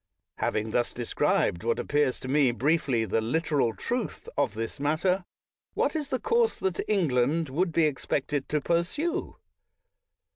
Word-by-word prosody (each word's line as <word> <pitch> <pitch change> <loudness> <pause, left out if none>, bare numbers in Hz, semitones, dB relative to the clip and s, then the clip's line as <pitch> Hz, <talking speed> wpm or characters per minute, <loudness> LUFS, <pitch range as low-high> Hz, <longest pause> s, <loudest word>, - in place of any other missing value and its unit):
Having 110 +1 -1
thus 120 +1 0
described 115 -5 0
what 115 0 +1
appears 145 -3 +1
to 130 - -6
me 140 0 +4
briefly 130 -2 +1
the 110 +2 0
literal 145 0 +1
truth 240 -2 -3
of 135 -7 0
this 115 +5 -4
matter, 175 +6 +1 0.5
what - - +1
is 300 -3 -1
the 265 -3 -1
course 465 - +2
that 190 -2 -2
England 155 - +2
would 170 +6 0
be 165 0 +3
expected 145 -1 -1
to 150 - +1
pursue? 175 - -1
150 Hz, 145 wpm, -27 LUFS, 125-175 Hz, 0.5 s, me